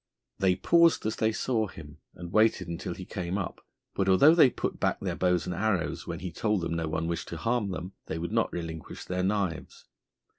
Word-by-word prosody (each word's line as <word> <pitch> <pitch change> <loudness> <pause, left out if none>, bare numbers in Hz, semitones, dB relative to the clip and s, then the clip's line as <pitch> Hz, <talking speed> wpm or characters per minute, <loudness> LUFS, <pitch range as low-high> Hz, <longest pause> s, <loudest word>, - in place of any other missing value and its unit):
They 95 -1 +3
paused 170 - +4
as 110 - -1
they 110 0 +2
saw 110 -1 0
him, 75 -5 -12 0.2
and 85 -1 -8
waited 110 -4 +3
until 85 +2 -4
he 95 - -8
came 90 -1 -3
up; 100 - -5 0.3
but 95 -1 0
although 140 - +7
they 160 -6 +7
put - - -4
back - - 0
their - - -3
bows 90 -2 +1
and 90 - -3
arrows 100 -1 -1
when - - -5
he 90 -1 -4
told 105 +2 0
them 85 - -2
no 85 -1 -1
one 80 +1 -2
wished 85 0 -3
to 85 - -6
harm 115 +2 0
them, 90 0 -5
they 80 - -3
would 85 +1 -4
not - - +1
relinquish 80 -2 -6
their 90 0 -2
knives. 95 -4 -2
95 Hz, 215 wpm, -28 LUFS, 85-110 Hz, 0.3 s, although